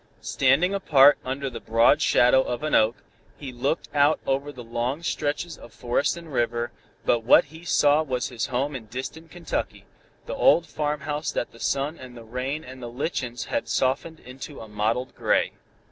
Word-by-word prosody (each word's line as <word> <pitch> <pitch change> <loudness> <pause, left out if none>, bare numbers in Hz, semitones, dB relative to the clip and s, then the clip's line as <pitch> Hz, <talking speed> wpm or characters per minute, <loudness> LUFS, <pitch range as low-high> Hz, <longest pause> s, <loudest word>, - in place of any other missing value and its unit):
Standing 140 +9 +2
apart 145 -7 +5
under 135 +2 -3
the 120 -3 -5
broad 115 +1 +3
shadow 125 +2 +5
of 125 +2 -4
an 155 - -2
oak, 110 +2 +4 0.4
he 140 -3 -7
looked 130 +6 -2
out 145 +1 +4
over 140 +2 -1
long 125 +4 -4
stretches 160 +1 -2
of 120 - -13
forest 125 +6 0
and 165 -3 -10
river, 120 -1 0 0.3
but 120 - +3
what 115 - +6
he 160 +1 -11
saw 150 -3 +4
was 130 -5 -2
his 120 -3 -3
home 135 +2 -1
in 115 -4 -7
distant 135 +8 -7
Kentucky 175 -1 -4 0.4
the - - -5
old 170 - +4
farmhouse 150 -1 -2
that - - -3
the 115 - -16
sun 140 +6 -1
and 125 -1 -11
the 115 - -10
rain 130 +6 -4
and 130 0 -11
the 120 - -6
lichens 125 -1 -3
had 285 - -3
softened 140 +5 0
into 135 +3 -9
a 110 - -9
mottled 110 +5 -1
gray. - - +1
135 Hz, 175 wpm, -25 LUFS, 120-150 Hz, 0.4 s, what